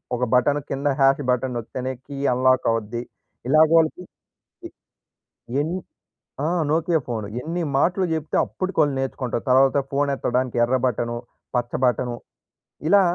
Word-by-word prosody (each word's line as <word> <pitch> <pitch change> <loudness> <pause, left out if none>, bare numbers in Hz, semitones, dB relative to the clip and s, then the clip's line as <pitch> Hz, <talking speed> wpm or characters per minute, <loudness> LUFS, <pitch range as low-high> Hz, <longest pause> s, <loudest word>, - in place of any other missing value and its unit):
ఒక 125 - -2
బటన్ 140 +4 +3
కింద 140 +2 -2
hash 135 +1 +4
button 125 0 -1
నొక్కితేనే 130 +3 -4
key 140 -1 -8 0.2
unlock 130 0 +3
అవుద్ది. 115 +1 -2 0.5
ఇలాగ 155 +2 +6
వాళ్ళకి 165 +3 +1 0.6
ఎ - - -16 0.9
ఎన్ని 170 +4 -2 0.7
ఆ! - - +1 0.2
Nokia 160 +1 +2
phone. 110 -3 -3 0.2
ఎన్ని 170 +5 -3 0.2
మాటలు 180 +5 +2
జేప్తే, 155 -1 -2
అప్పటికి 185 -1 -5
వాళ్ళు 145 -2 +2
నేర్చుకుంటారు. 130 -3 -3
తర్వాత 135 +2 +5
ఫోన్ 140 +1 +1
ఎత్తడానికి 125 -1 -1
ఎర్ర 125 +2 +2
బటను, 120 -1 -1 0.4
పచ్చ 120 0 -1
బటను. 125 -1 0 0.7
ఇలా 200 +2 +6
135 Hz, 135 wpm, -23 LUFS, 125-155 Hz, 0.9 s, ఇలాగ